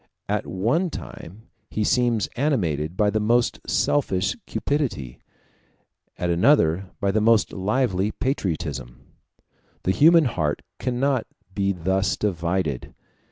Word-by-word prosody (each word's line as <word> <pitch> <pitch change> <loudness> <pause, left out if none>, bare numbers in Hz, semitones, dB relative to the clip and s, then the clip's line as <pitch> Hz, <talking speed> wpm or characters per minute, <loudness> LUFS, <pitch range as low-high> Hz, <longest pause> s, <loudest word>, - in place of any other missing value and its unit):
At - - -1
one 120 - 0
time 105 - -9 0.3
he 110 - -1
seems 120 -1 +2
animated 90 - 0
by 105 -1 +3
the 110 - 0
most 120 +3 +2
selfish 100 -11 +1
cupidity, 125 - -2 1.0
at 90 -1 -1
another 90 - +3
by 100 -2 +1
the 110 +2 +1
most 115 -1 +3
lively 100 -1 0
patriotism. 75 - -3 0.8
The 95 - +2
human 165 - +6
heart 80 - -1 0.2
cannot 130 0 0 0.3
be 100 -1 +1
thus 95 +2 0
divided. 85 -7 -2
100 Hz, 115 wpm, -24 LUFS, 85-120 Hz, 1.0 s, human